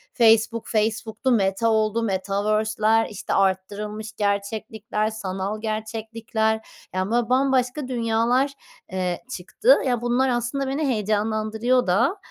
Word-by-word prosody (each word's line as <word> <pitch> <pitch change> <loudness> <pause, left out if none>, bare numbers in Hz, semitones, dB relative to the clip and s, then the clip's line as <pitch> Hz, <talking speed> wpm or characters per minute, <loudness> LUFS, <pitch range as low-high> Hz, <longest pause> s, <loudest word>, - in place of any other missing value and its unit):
Facebook, 225 -1 +3
Facebook'tu, 220 +3 0
Meta 200 +1 +2
oldu, 220 +1 +1
Metaverse'ler, 215 +3 +1
işte, 205 - -4
arttırılmış 205 +3 -1
gerçeklikler, 210 +1 -2
sanal 200 0 -4
gerçeklikler, 220 0 -2 0.3
yani, 185 +3 -1
böyle, 240 0 +1
bambaşka 260 +1 +1
dünyalar, 240 +3 +1 0.4
eee, 180 0 -2
çıktı. 440 - +3
Ya, 245 -2 0
bunlar, 245 +2 +2
aslında, 245 +3 -1
beni 280 +2 -1
heyecanlandırıyor 215 +2 0
da, 240 - +2
220 Hz, 105 wpm, -23 LUFS, 210-240 Hz, 0.4 s, Facebook